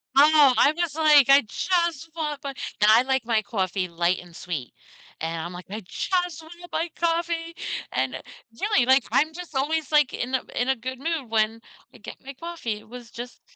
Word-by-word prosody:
Oh, 290 Hz, -1 st, +7 dB
I'm 305 Hz, +3 st, +4 dB
just 345 Hz, -4 st, -1 dB
like, 300 Hz, -4 st, +6 dB
"I 275 Hz, +1 st, +8 dB
just 330 Hz, -, -1 dB
want 300 Hz, -3 st, -3 dB
my" 280 Hz, -, -3 dB, 0.3 s
and 210 Hz, -, +6 dB
I 225 Hz, +3 st, +7 dB
like 265 Hz, -2 st, 0 dB
my 225 Hz, -2 st, +2 dB
coffee 190 Hz, -3 st, -2 dB
light 170 Hz, +2 st, 0 dB
and 175 Hz, -1 st, -14 dB
sweet, 160 Hz, -8 st, -6 dB, 0.5 s
and 165 Hz, 0 st, -3 dB
I'm 170 Hz, +2 st, -6 dB
like, 180 Hz, 0 st, -9 dB
"I 215 Hz, +3 st, -5 dB
just 355 Hz, -, -2 dB
wanna 345 Hz, +2 st, -13 dB
buy 335 Hz, -, -1 dB
coffee," 335 Hz, 0 st, -1 dB, 0.4 s
and -, -, -2 dB, 0.4 s
really, 415 Hz, -, +2 dB
like, 260 Hz, 0 st, +5 dB
I'm 310 Hz, +2 st, +2 dB
just 350 Hz, -2 st, -9 dB
always, 295 Hz, +2 st, -1 dB
like, 295 Hz, -3 st, +4 dB
in 250 Hz, +2 st, -4 dB
a 260 Hz, -, -1 dB
in 245 Hz, +2 st, 0 dB
a 265 Hz, -, +2 dB
good 255 Hz, +2 st, -6 dB
mood 310 Hz, -5 st, -3 dB
when 225 Hz, 0 st, +1 dB, 0.3 s
I -, -, -14 dB
get -, -, -11 dB
my 275 Hz, -, -8 dB
coffee. 325 Hz, -6 st, -5 dB
It 215 Hz, -, -19 dB
was 240 Hz, -1 st, -11 dB
just 245 Hz, +1 st, -9 dB
270 Hz, 200 wpm, -25 LUFS, 225-320 Hz, 0.5 s, I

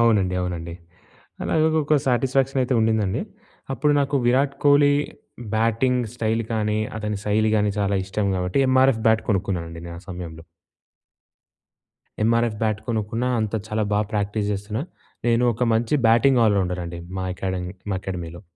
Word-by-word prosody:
అవునండి, 105 Hz, -6 st, +3 dB
అవునండి. 85 Hz, -2 st, -4 dB, 0.7 s
అలాగ 155 Hz, -, +1 dB, 0.2 s
ఒక 150 Hz, +1 st, +3 dB
సాటిస్ఫాక్షన్ 135 Hz, +2 st, +1 dB
అయితే 125 Hz, 0 st, 0 dB
ఉండిందండి. 110 Hz, -3 st, +1 dB, 0.5 s
అప్పుడు 150 Hz, +2 st, +2 dB
నాకు 140 Hz, 0 st, -1 dB
'విరాట్ 135 Hz, +3 st, +2 dB
కోహ్లీ' 145 Hz, 0 st, +5 dB, 0.6 s
బ్యాటింగ్ 115 Hz, +3 st, +2 dB
స్టైల్ 115 Hz, -1 st, 0 dB
కానీ, 105 Hz, -1 st, 0 dB, 0.2 s
అతని 105 Hz, -1 st, -3 dB
శైలి 110 Hz, +1 st, +2 dB
గానీ 105 Hz, -1 st, +1 dB
చాలా 100 Hz, 0 st, +1 dB
ఇష్టం 100 Hz, +1 st, -2 dB
కాబట్టి 90 Hz, +7 st, -1 dB
ఎంఆర్ఎఫ్ 130 Hz, -3 st, +4 dB
బ్యాట్ 110 Hz, 0 st, +4 dB
కొనుక్కున్నానండి 85 Hz, -4 st, -2 dB
నేను 85 Hz, 0 st, -7 dB
ఆ -, -, -22 dB
సమయంలో. 85 Hz, -3 st, -7 dB, 1.8 s
ఎమ్ఆర్ఎఫ్ 115 Hz, -1 st, +2 dB
బ్యాట్ 110 Hz, -1 st, 0 dB
కొనుక్కున్నా, 115 Hz, +2 st, -1 dB
అంత 110 Hz, 0 st, -2 dB
చాలా 110 Hz, 0 st, -1 dB
బాగా 105 Hz, 0 st, +1 dB
ప్రాక్టీస్ 105 Hz, 0 st, -1 dB
జేస్తున్నా. 105 Hz, +5 st, -3 dB, 0.4 s
నేను 120 Hz, +1 st, +3 dB
ఒక 115 Hz, +3 st, -4 dB
మంచి 115 Hz, +5 st, +1 dB
బ్యాటింగ్ 120 Hz, +3 st, +4 dB
ఆల్ 105 Hz, -2 st, +4 dB
రౌండర్ 90 Hz, -1 st, -1 dB
అండి 85 Hz, 0 st, -6 dB, 0.2 s
మా 95 Hz, -, -2 dB
ఎకాడమీ 90 Hz, -1 st, -4 dB, 0.2 s
మా 95 Hz, -, 0 dB
ఎకాడమీలో. 85 Hz, -2 st, -6 dB
110 Hz, 145 wpm, -23 LUFS, 95-120 Hz, 1.8 s, కోహ్లీ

